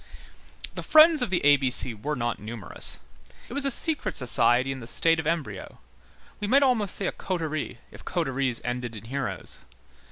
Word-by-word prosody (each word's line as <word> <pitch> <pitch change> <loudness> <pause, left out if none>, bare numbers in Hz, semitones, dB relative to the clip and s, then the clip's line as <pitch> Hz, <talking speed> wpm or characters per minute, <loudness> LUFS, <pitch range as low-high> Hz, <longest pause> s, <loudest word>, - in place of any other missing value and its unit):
The - - -5
Friends 310 -1 +6
of 245 - 0
the 180 -5 0
A 145 0 +7
B 135 -2 0
C 125 -1 -2
were 130 +8 -4
not 120 -3 -2
numerous, 110 -2 -5 0.5
it - - -8
was 280 +1 +1
a - - +2
secret 305 +4 +1
society 125 +1 +3
in 135 - -5
the 115 - -10
state 165 +5 +2
of 160 - -3
embryo, 145 - -4 0.6
we 205 - -3
might 275 +6 +4
almost 225 -7 +1
say 200 - -3
a - - 0
coterie, 160 -8 -4
if - - -13
coteries 135 -8 -1
ended 120 -1 -4
in 110 - -10
heroes. 135 +4 -4
145 Hz, 185 wpm, -26 LUFS, 120-195 Hz, 0.6 s, A